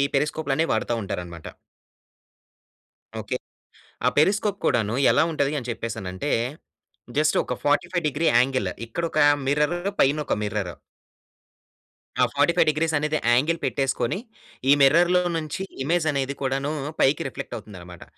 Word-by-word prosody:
పెరిస్కోప్లనే 150 +1 0
వాడతా 110 +2 -1
ఉంటారనమాట. 85 -4 -6 1.7
ఓకె. - - -3 0.7
ఆ - - +7
పెరిస్కోప్ 200 +4 +2
కూడానూ, 110 0 +1 0.2
ఎలా - - +4
ఉంటది 145 -2 0
అని 125 -1 -7
చెప్పేసనంటే, 110 +1 -4 0.9
జస్ట్ 155 0 +3
ఒక - - -3
45 175 +3 +1
డిగ్రీ 155 +4 -1
యాంగిల్, 130 +1 +1 0.2
ఇక్కడొకా 155 +4 0 0.2
మిర్ర్ర్, 150 +5 +1 0.2
పైనొక 145 +2 +2
మిర్ర్ర్. 105 -4 -3 1.5
ఆ - - +6
45 170 -2 +3
డిగ్రీస్ 160 +1 0
అనేది, 150 +1 0 0.2
యాంగిల్ 155 +7 +2
పెట్టేసుకొని, 135 +2 -1 0.5
ఈ - - +8
మిర్రర్లో 175 +6 +5 0.2
నుంచి 155 +4 -4 0.2
ఇమేజనేది 145 -4 0
కూడానూ, 135 +2 -1 0.3
పైకి 140 +2 +3
రిఫ్లెక్టవుతుందినమాట. 95 -7 -8
145 Hz, 110 wpm, -24 LUFS, 120-160 Hz, 1.7 s, ఈ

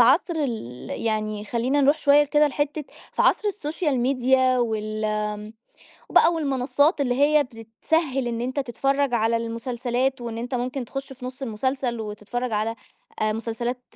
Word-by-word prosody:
في - - +10
عصر 300 +8 +4
ال 225 - -4
يعني 215 -1 -2
خلينا 245 +6 +1
نروح 285 +3 +4
شوية 290 0 +5
كده 295 +1 +3
لحتّة 290 +1 -2 0.3
في - - +1
عصر 420 - +3
السوشيال 310 -7 -1
ميديا 255 0 +3
وال 215 -2 -1
آمم، 210 0 -2 0.6
بقى 335 - +6
والمنصات 285 +1 +1
اللي 250 -3 +1
هي 290 +2 +4
بتسهّل 255 +4 -1
إن 230 -1 -3
أنت 260 +4 -1
تتفرج 275 +1 0
على 230 0 +2
المسلسلات، 245 +3 -2
وإن 230 -1 -5
أنت 245 +2 -4
ممكن 250 +1 -2
تخش 270 +3 -6
في 255 -1 -11
نُص 260 +2 -8
المسلسل 250 +1 -1
وتتفرج 220 +3 -4
على 215 +2 0 0.5
آآ، 215 0 +2
مسلسلات 235 +3 -3
250 Hz, 155 wpm, -24 LUFS, 225-275 Hz, 0.6 s, في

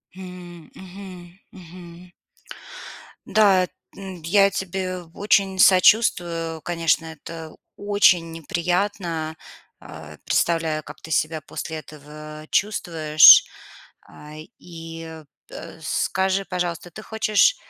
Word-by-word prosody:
М. 180 -3 -11
Мгм, 185 -1 -12
мгм. 175 0 -14 1.1
Да, 200 -4 +4
эт 180 - -6 0.3
м, 190 -3 -9
д 160 - -8
я 200 0 +5
тебе 185 -1 -4
очень 195 -1 +1
сочувствую. 175 -5 +3
Конечно, 165 0 0
это 160 0 -10 0.2
очень 195 -5 +2
неприятно. 170 -1 -3 0.4
А, 75 -1 -12
представляю, 165 -2 0
как - - -12
ты 160 - -11
себя 155 0 0
после 160 +2 -7
этого 155 0 -11
чувствуешь. 160 -7 +6 0.6
А, 150 0 -15 0.3
и, 165 -2 -10 0.3
э, - - -10
скажи, 190 +1 -1
пожалуйста, 175 -1 -4
ты 215 - -10
хочешь, 220 - +2
175 Hz, 100 wpm, -22 LUFS, 160-190 Hz, 1.1 s, чувствуешь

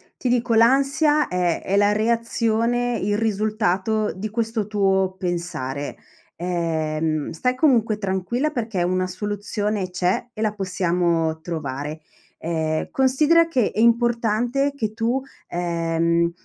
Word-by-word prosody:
ti 250 - -2
dico 240 -1 +1
l'ansia 275 +6 +4
è 180 -2 0
è 195 - -1
la 205 0 +4
reazione, 230 +2 +1
il 205 +1 0
risultato 215 -1 0
di 205 +3 -5
questo 225 -1 -2
tuo 190 -2 +1
pensare. 170 -6 -3 0.4
Ehm, 160 -3 -1
stai 250 +10 -1
comunque 235 -7 +3
tranquilla 210 +9 -1
perché 220 -9 -2
una 185 +1 0
soluzione 205 +1 -3
c'è 180 +6 -1
e 215 - -7
la 215 -1 +1
possiamo 175 -4 0
trovare. 150 -2 -4 0.4
Ehm, 160 -1 -2
considera 300 +6 +3
che 250 -9 +1
è - - -4
importante 235 +3 +2
che 220 -6 -3
tu, 235 +4 0 0.3
ehm, 170 -1 0
205 Hz, 120 wpm, -22 LUFS, 175-235 Hz, 0.4 s, l'ansia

